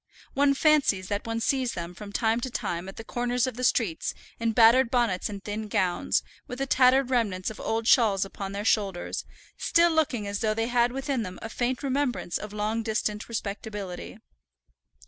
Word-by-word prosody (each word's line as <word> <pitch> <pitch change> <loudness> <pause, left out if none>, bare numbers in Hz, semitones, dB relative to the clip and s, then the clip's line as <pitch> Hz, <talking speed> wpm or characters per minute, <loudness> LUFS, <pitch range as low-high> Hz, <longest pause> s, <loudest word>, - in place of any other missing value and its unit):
One 280 0 +3
fancies 275 - +3
that 205 +2 -2
one 225 0 -1
sees 255 +1 0
them 170 0 -5
from 200 +3 -9
time 225 +2 +1
to 260 - -3
time 175 -5 -3
at 195 - -10
the 225 - -6
corners 245 +1 0
of 255 - -3
the 250 - -5
streets 220 -9 +1 0.2
in 230 0 +1
battered 235 +2 +6
bonnets 235 -8 +1
and 200 -1 -7
thin 215 +1 -4
gowns, 185 -3 +1 0.2
with 250 - -6
the 270 - -1
tattered 260 0 +4
remnants 210 -6 0
of 215 - -11
old 225 0 -1
shawls 205 -7 +4
upon 195 0 -6
their 200 +1 -4
shoulders, 195 -6 0 0.3
still 340 0 +3
looking 300 -9 +1
as 200 0 -3
though 215 -1 0
they 225 +1 -1
had 240 0 +3
within 270 -1 -2
them 185 -4 -6
a 225 - -5
faint 245 +3 -2
remembrance 270 -8 -1
of 210 - -7
long 210 +2 -1
distant 215 -1 -2
respectability. 205 -3 -5
225 Hz, 185 wpm, -27 LUFS, 205-250 Hz, 0.3 s, battered